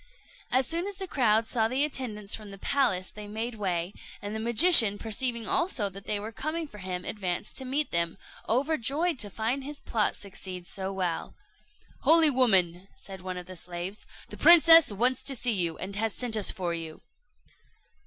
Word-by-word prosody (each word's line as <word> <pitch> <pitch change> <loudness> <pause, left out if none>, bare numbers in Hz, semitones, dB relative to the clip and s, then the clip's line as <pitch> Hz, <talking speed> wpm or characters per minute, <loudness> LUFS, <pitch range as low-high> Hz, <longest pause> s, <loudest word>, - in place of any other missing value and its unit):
As 260 +1 +2
soon 335 +7 -1
as 405 - -4
the 385 0 -3
crowd 230 - +1
saw 225 -1 0
the 260 +5 +1
attendants 215 -8 -4
from 215 -2 -5
the 195 - -10
palace, 215 -7 0
they 210 0 -9
made 220 +3 -4
way; 185 -3 -2 0.3
and 205 +1 -6
the - - -3
magician, 230 - +6
perceiving 230 +1 -1
also 260 - 0
that 195 +1 -11
they 210 - 0
were 215 +2 -7
coming 310 +7 -4
for 210 -7 -13
him, 180 -1 -5
advanced 185 -2 -4
to 265 - -3
meet 285 +4 -1
them, 170 +1 0 0.3
overjoyed 290 +4 0
to 205 - -1
find 230 +7 -3
his 290 +1 -8
plot 220 -2 -1
succeed 185 -2 -8
so 190 +2 -3
well. 180 -3 -3 0.6
"Holy 325 -2 +5
woman," 190 -8 +2
said 190 -2 -11
one 185 0 -6
of 180 - -7
the 185 +1 -10
slaves, 175 +3 -7 0.2
"the - - -10
princess 330 -4 +8
wants 245 +5 0
to 275 - 0
see 245 -1 0
you, 170 -5 -1
and 195 +1 -6
has 220 -1 -2
sent 245 -3 0
us 210 -3 +1
for 175 -2 -3
you." 165 -2 -7
220 Hz, 185 wpm, -27 LUFS, 190-265 Hz, 0.6 s, princess